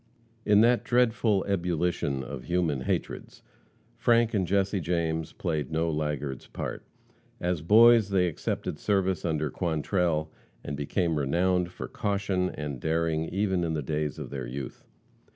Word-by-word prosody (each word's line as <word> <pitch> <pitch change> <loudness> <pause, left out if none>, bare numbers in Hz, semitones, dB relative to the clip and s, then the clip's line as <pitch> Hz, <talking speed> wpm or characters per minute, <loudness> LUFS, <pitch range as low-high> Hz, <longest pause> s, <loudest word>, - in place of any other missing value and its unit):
In 105 0 +5
that 120 +1 +4
dreadful 115 -4 +2
ebullition 85 -7 -1
of 65 -1 -7
human 85 -6 0
hatreds, - - -4 0.5
Frank 115 -1 +3
and 95 -4 +1
Jesse 100 +1 +1
James 80 -2 -1
played 75 -5 -3
no 80 +1 0
laggard's 75 -3 -3
part. - - -5 0.6
As 90 -3 -1
boys, 110 +4 +6
they 95 -2 +2
accepted 75 -2 -3
service 95 -3 0
under 75 -3 -1
Quantrell, 80 -1 0 0.3
and 70 - -4
became 80 +3 -1
renowned 90 +5 +1
for - - -7
caution 100 -3 -1
and 75 -6 -5
daring 80 0 0
even 95 -2 0
in 80 -1 -1
the 75 - -2
days 75 +1 -2
of - - -7
their 65 -3 -4
youth. 65 +2 -7
85 Hz, 140 wpm, -28 LUFS, 75-95 Hz, 0.6 s, boys